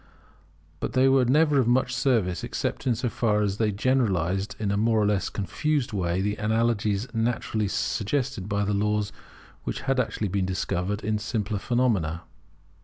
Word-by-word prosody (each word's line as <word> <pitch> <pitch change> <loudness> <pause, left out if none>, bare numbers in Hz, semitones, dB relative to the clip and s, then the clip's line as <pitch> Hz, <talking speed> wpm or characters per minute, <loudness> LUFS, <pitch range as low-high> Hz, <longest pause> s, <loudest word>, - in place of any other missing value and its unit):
But - - -3
they 130 0 +4
were 135 -1 +4
never 150 +2 +4
of 125 - +2
much 125 +1 +2
service, 120 -9 +1
except - - -3
so 125 +1 -1
far 105 -3 +1
as 100 -1 -1
they 110 -1 +1
generalized 100 -5 0
in 105 -2 -1
a - - +1
more 110 +2 +2
or 105 - +3
less 100 -2 +1
confused 140 +6 -1
way 90 -2 0
the 105 +1 -1
analogies 110 -1 0
naturally 115 -2 0
suggested 100 - -1
by 100 0 0
the 105 - 0
laws 105 0 0 0.5
which - - -4
had 135 -1 0
actually 110 -3 -1
been 95 0 0
discovered 95 +2 -2
in 105 0 0
simpler 105 -1 -2
phenomena. 100 -10 0
105 Hz, 165 wpm, -26 LUFS, 100-125 Hz, 0.5 s, they